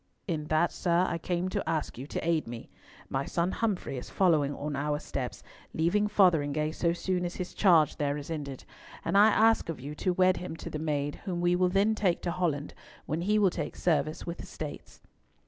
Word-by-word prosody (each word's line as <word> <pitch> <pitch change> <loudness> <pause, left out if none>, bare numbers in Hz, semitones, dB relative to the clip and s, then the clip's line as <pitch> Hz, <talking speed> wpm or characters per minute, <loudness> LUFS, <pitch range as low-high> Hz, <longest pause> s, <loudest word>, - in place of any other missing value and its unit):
"In 160 -5 -2
that, 155 +3 +2
sir, 175 0 +2
I 170 - -2
came 175 +1 -1
to - - -2
ask 160 -2 -1
you 130 +4 -7
to 160 - -4
aid 165 -5 +1
me. 115 -1 -8 0.4
My 135 0 -1
son 170 +2 0
Humfrey 195 - -2
is - - -9
following 160 -7 +3
on 145 0 -4
our 145 +1 0
steps, 135 -4 -5 0.3
leaving 175 +6 +2
Fotheringhay 155 -7 +3
so 170 0 +1
soon 180 +1 -1
as 175 0 -3
his 180 -1 -5
charge 165 -7 +4
there 145 -1 0
is 145 +2 -7
ended; 140 -4 -5 0.4
and - - 0
I 205 +2 +8
ask 220 -3 +4
of 165 - -4
you 140 +4 -6
to 185 +4 0
wed 185 0 +3
him 180 - -5
to - - -8
the 155 - -4
maid, 145 -2 -2
whom 180 -3 -2
we 175 0 +3
will 180 0 +3
then 200 +4 +3
take 195 -5 0
to 175 - -1
Holland, 165 -5 -1 0.3
when 155 +3 -2
he 210 +4 +2
will 200 -3 +4
take 155 -4 -4
service 155 -2 0
with 170 0 -5
the - - -8
States." - - -8
170 Hz, 215 wpm, -29 LUFS, 150-185 Hz, 0.4 s, I